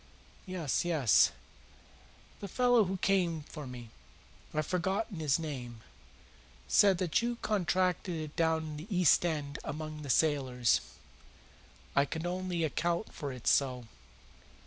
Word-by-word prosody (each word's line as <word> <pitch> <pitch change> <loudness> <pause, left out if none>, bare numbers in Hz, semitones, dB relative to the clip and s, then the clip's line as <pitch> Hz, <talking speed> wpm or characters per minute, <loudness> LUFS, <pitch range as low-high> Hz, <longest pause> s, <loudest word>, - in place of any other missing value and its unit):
"Yes, 180 -6 -1
yes." 155 - +4 1.1
"The 200 - -6
fellow 245 +1 +3
who 190 +1 -2
came 175 -5 +1
for 150 -2 -9
me 120 -3 -9 0.6
I've 155 0 -1
forgotten 190 +3 -2
his 145 -3 +2
name 125 -8 -6 0.9
said 195 -3 +5
that 175 +1 +1
you 240 +1 -1
contracted 180 -2 0
it 155 -2 -6
down 160 -1 +1
in 155 -1 -6
the 155 +5 -8
East 180 -5 +4
End 150 -4 -2
among 155 0 -5
the 145 - -7
sailors." 130 -5 +2 1.1
"I 140 - +4
could 160 +4 -5
only 180 -1 -2
account 170 +5 -1
for 145 -3 -5
it 125 -2 -10
so." 130 -3 +2
160 Hz, 130 wpm, -31 LUFS, 145-185 Hz, 1.1 s, said